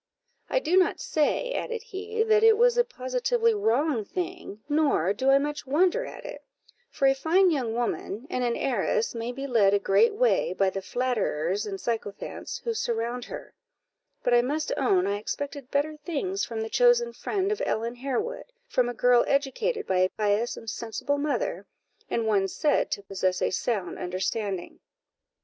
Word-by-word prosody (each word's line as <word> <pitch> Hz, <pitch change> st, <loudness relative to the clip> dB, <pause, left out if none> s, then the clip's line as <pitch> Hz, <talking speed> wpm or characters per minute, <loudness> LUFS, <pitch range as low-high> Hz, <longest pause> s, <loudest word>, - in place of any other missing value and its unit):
"I -, -, +1 dB
do 365 Hz, -7 st, +2 dB
not 370 Hz, -, +3 dB
say," -, -, 0 dB
added 470 Hz, -2 st, -3 dB
he, 435 Hz, +3 st, -2 dB
"that 435 Hz, -1 st, +3 dB
it 450 Hz, -1 st, +7 dB
was 485 Hz, +1 st, +4 dB
a 485 Hz, -, +4 dB
positively 460 Hz, -, 0 dB
wrong 285 Hz, -, +1 dB
thing, 350 Hz, -, -6 dB
nor 290 Hz, -, +2 dB
do 260 Hz, +6 st, 0 dB
I 270 Hz, -, +7 dB
much 295 Hz, 0 st, -3 dB
wonder 365 Hz, -, +2 dB
at -, -, -10 dB
it; -, -, -8 dB, 0.5 s
for 275 Hz, -, -1 dB
a 270 Hz, -, +5 dB
fine 340 Hz, +7 st, +3 dB
young 245 Hz, -7 st, -1 dB
woman, 235 Hz, -1 st, -3 dB
and 250 Hz, -, -2 dB
an 240 Hz, -1 st, +1 dB
heiress, 455 Hz, -, 0 dB
may 230 Hz, +1 st, -3 dB
be 270 Hz, +2 st, -6 dB
led 210 Hz, -7 st, +4 dB
a -, -, +2 dB
great 200 Hz, -, +3 dB
way, -, -, +2 dB
by 195 Hz, -1 st, +1 dB
the 195 Hz, -, -4 dB
flatterers 210 Hz, -5 st, -1 dB
and 195 Hz, -1 st, -5 dB
sycophants 220 Hz, -3 st, -4 dB
who 465 Hz, -, -1 dB
surround 235 Hz, -, -2 dB
her; -, -, -9 dB, 0.7 s
but 245 Hz, -, +2 dB
I 240 Hz, -, +6 dB
must 295 Hz, +5 st, -2 dB
own 195 Hz, -10 st, +2 dB
I 200 Hz, +1 st, -1 dB
expected 280 Hz, +4 st, -5 dB
better 295 Hz, +2 st, 0 dB
things 350 Hz, +5 st, -3 dB
from 225 Hz, -1 st, -3 dB
the 220 Hz, -, -4 dB
chosen 485 Hz, -1 st, +4 dB
friend 390 Hz, 0 st, -1 dB
of 425 Hz, -, -2 dB
Ellen 230 Hz, +2 st, -1 dB
Harewood, 430 Hz, -, -3 dB, 0.2 s
from 250 Hz, -, +1 dB
a 245 Hz, -, -5 dB
girl 245 Hz, 0 st, +4 dB
educated 355 Hz, -, 0 dB
by 185 Hz, -, +1 dB
a 185 Hz, 0 st, +3 dB
pious 210 Hz, +3 st, 0 dB
and 225 Hz, -, -11 dB
sensible 235 Hz, +6 st, -2 dB
mother, 245 Hz, -, -2 dB, 0.4 s
and 230 Hz, -, 0 dB
one 200 Hz, -3 st, +2 dB
said 295 Hz, -, +1 dB
to 200 Hz, -, -3 dB
possess 185 Hz, -2 st, -1 dB
a -, -, 0 dB
sound 195 Hz, -1 st, -2 dB
understanding." 190 Hz, +1 st, -3 dB
260 Hz, 175 wpm, -27 LUFS, -, 0.7 s, it